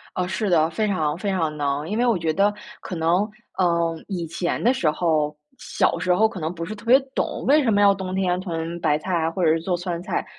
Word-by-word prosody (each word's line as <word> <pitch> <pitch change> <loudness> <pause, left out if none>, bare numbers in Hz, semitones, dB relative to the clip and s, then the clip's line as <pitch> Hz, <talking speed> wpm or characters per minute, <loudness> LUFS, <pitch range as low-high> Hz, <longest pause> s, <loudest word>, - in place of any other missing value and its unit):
呃， 180 - 0
是 195 +3 -2
的， 160 -3 +3
非 210 +6 -1
常 160 -6 0
非 200 +3 -3
常 165 -5 -1
能。 145 +1 -1
因 215 - -2
为 245 - +2
我 235 -5 +3
觉 165 -2 0
得 200 +4 +2 0.3
可 185 - -6
能， 175 +6 +1 0.3
嗯， 170 -2 +1
以 180 -4 -3
前 170 +2 -2
的 245 +4 +4
时 180 -12 +1
候， 155 -2 0 0.2
小 - - 0
时 185 -1 +2
候 220 +4 +4
可 220 -4 -8
能 160 +1 -3
不 165 -1 -5
是 210 - -5
特 215 +1 -13
别 245 +3 +7 0.2
懂， - - -2
为 295 +3 +5
什 255 - +1
么 205 0 +3
要 200 -1 +6
冬 190 -1 -5
天 180 -2 0
囤 170 -2 -4
白 150 -3 +2
菜 185 +4 -4
啊， 165 -2 +1
或 185 - -2
者 160 - +5
是 165 - +2
做 180 +2 -1
酸 175 -1 -4
菜。 - - -2
175 Hz, 270 characters per minute, -23 LUFS, 165-200 Hz, 0.3 s, 别